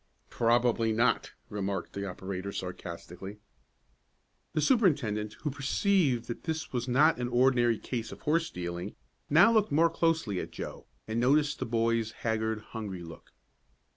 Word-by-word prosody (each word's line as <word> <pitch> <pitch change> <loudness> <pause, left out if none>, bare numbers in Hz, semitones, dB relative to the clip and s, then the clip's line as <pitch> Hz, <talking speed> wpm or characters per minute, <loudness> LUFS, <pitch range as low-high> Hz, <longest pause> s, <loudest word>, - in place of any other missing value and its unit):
"Probably 115 -1 +2
not," 115 +2 +1
remarked 100 -4 -3
the 100 0 -4
operator, 95 +1 -5
sarcastically. 90 +1 -7 1.2
The 155 - +1
superintendent, 140 - +2
who 150 - 0
seemed - - -10
to - - -19
perceive 140 - +2
that 120 - -6
this 160 -2 -3
was 120 0 -1
not 140 +4 +4
an 125 - -1
ordinary 120 -2 +3
case 115 -1 -4
of - - -10
horse 165 +2 +1
stealing, 90 +2 -5 0.3
now 170 +10 +7
looked 215 -5 +3
more 165 +3 +4
closely 160 - +1
at - - -5
Joe, - - -8 0.2
and 110 +1 -1
noticed 145 +4 +3
the - - -2
boy's 115 -1 +1
haggard, 110 -1 -1
hungry 100 -6 -5
look. 80 -1 -12
115 Hz, 150 wpm, -30 LUFS, 105-145 Hz, 1.2 s, now